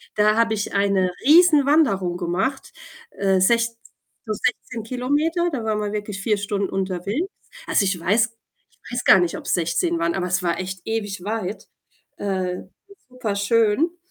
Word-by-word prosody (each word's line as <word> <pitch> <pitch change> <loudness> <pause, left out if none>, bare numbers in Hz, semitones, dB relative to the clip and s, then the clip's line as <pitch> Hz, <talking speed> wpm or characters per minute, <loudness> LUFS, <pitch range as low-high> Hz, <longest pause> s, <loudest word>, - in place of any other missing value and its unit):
da 215 0 +3
habe 225 -1 +2
ich 205 -1 -3
eine 200 -2 +2
Riesenwanderung 290 - +4
gemacht, 185 +10 -2 0.4
äh, 195 -1 +1
sechz 230 +4 +2 0.5
so 215 - -2
16 225 +2 -3
Kilometer. 290 +9 0
Da 260 -6 -3
war 220 -1 0
man 210 -1 -2
wirklich 205 -2 -4
4 210 0 +1
Stunden 200 -1 -2
unterwegs. 195 - -2 0.4
Also, 200 - +2
ich 185 -2 0
weiß 215 +7 +2 0.4
ich - - -16
weiß 245 - -2
gar 190 - +8
nicht, 175 -1 0
ob's - - -3
16 335 - 0
waren, 335 0 0
aber 180 - -1
es 180 +1 0
war 170 -1 0
echt 185 0 -5
ewig 205 -4 -3
weit. 210 -1 -4 0.5
Äh, 185 -2 -2 0.5
super 250 -5 -3
schön. 230 - +2
210 Hz, 155 wpm, -22 LUFS, 190-245 Hz, 0.5 s, gar